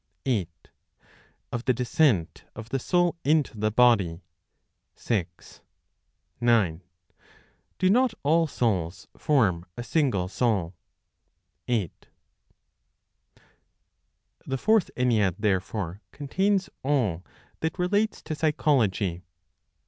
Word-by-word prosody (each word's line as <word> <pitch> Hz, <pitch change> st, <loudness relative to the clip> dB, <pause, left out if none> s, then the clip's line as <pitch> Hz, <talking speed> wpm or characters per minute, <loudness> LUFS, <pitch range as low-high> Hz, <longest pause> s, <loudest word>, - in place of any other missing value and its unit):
8. 110 Hz, -11 st, 0 dB, 1.0 s
Of 120 Hz, +1 st, -4 dB
the 130 Hz, -, +2 dB
Descent 120 Hz, -, +1 dB
of 115 Hz, 0 st, -9 dB
the 135 Hz, -, -1 dB
Soul 175 Hz, +5 st, +1 dB
into 150 Hz, -4 st, +2 dB
the 110 Hz, 0 st, 0 dB
Body, 105 Hz, -7 st, +3 dB, 0.7 s
6. 90 Hz, -7 st, -4 dB, 0.8 s
9. 110 Hz, -9 st, +2 dB, 1.0 s
Do 185 Hz, -, +2 dB
not 245 Hz, 0 st, +3 dB
all 165 Hz, +3 st, +3 dB
Souls 90 Hz, -, -2 dB
form 105 Hz, -, +1 dB
a 120 Hz, -, -4 dB
Single 125 Hz, -, 0 dB
Soul? 100 Hz, -5 st, 0 dB, 0.9 s
8. 110 Hz, -9 st, -2 dB, 2.4 s
The 135 Hz, -, -1 dB
Fourth 215 Hz, -, +2 dB
Ennead, 110 Hz, -8 st, +2 dB
therefore, 100 Hz, -2 st, -2 dB
contains 190 Hz, +7 st, 0 dB
all 120 Hz, -, 0 dB, 0.4 s
that 160 Hz, +1 st, -2 dB
relates 205 Hz, +4 st, 0 dB
to 155 Hz, -, -4 dB
Psychology. 120 Hz, -, +1 dB
120 Hz, 95 wpm, -26 LUFS, 95-150 Hz, 2.4 s, Body